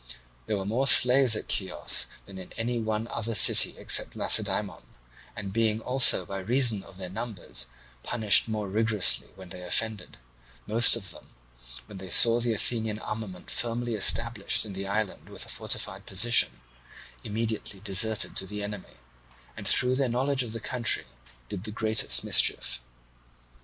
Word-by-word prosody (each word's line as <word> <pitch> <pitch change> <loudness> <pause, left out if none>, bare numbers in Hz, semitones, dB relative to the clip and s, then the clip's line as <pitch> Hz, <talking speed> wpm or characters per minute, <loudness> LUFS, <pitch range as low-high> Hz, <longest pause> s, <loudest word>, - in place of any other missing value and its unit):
There 105 - -3
were 95 - -7
more 120 +7 -2
slaves 125 -2 +7
at - - -6
Chios 95 -2 -1 0.2
than 95 -1 -13
in 90 - -13
any 120 +1 -5
one 110 0 -5
other 115 -1 -6
city 95 - +5
except - - +3
Lacedaemon, - - 0 0.5
and 100 -2 -8
being 110 -1 -1
also 125 -6 +4
by 95 +1 -8
reason 115 +1 0
of 95 -1 -15
their 95 -1 -6
numbers 110 -2 -7 0.3
punished 110 - +2
more 110 -2 -6
rigorously 110 0 0
when 95 -2 -15
they 90 - -10
offended, 105 +1 -3 0.5
most 115 +2 +4
of 100 -5 -6
them, - - -17 0.5
when 95 - -13
they 95 -1 -11
saw 115 +5 +7
the 120 -1 -3
Athenian 110 -1 -2
armament 105 -4 -9
firmly 120 0 -4
established 110 +1 +1
in 105 - -10
the 95 +1 -7
island 105 0 -5
with - - -7
a - - -11
fortified - - -1
position, 95 - +2 0.6
immediately 110 -2 -6
deserted 105 +2 +1
to 95 - +1
the 105 +1 -6
enemy, 100 -7 -9 0.6
and - - -8
through 125 0 +2
their 130 -1 -2
knowledge 130 +3 -2
of 115 -3 -6
the 115 - -6
country 120 0 0 0.4
did 100 -2 -9
the 110 - -7
greatest 110 +1 +2
mischief. - - +1
110 Hz, 155 wpm, -25 LUFS, 100-115 Hz, 0.6 s, slaves